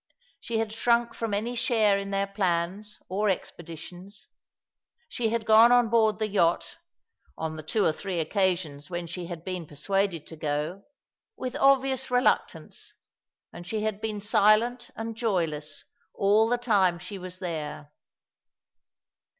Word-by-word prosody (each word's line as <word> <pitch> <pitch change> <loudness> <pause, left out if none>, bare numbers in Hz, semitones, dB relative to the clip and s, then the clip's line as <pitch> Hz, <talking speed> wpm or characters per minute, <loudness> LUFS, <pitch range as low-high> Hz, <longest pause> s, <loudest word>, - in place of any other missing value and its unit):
She 230 - -3
had 220 -1 -1
shrunk 235 +1 +2
from 230 -2 -3
any 215 +4 -1
share 220 -4 +2
in 200 0 -5
their 195 0 0
plans 195 +1 -2
or 205 +3 0
expeditions. 175 +2 -6 0.8
She 235 - -1
had 230 -1 -1
gone 225 +2 +7
on 245 -2 +5
board 220 -1 +3
the 215 0 -1
yacht 175 -5 +1 0.3
— 70 - -39
on 160 0 -3
the 155 - -6
tw^o 195 +6 +1
or - - +2
three 185 +1 -4
occasions 170 -4 -1
when 175 -1 -4
she 170 +1 -6
had 170 -2 -8
been 180 -4 -4
persuaded 175 +2 -1
to 160 - -10
go 150 +5 -3 0.2
— 450 - -66
with 255 0 -4
obvious 270 -1 +3
reluctance, 250 0 0 0.6
and 175 0 -10
she 215 +2 -2
had 215 -1 -2
been 215 -2 -3
silent 220 +4 +3
and 225 0 -5
joyless 165 -9 -2 0.3
all 210 +3 +3
the 245 - +2
time 200 -7 +2
she 180 +3 -8
was 185 0 -8
there. 155 -5 -5
200 Hz, 150 wpm, -27 LUFS, 175-225 Hz, 0.8 s, gone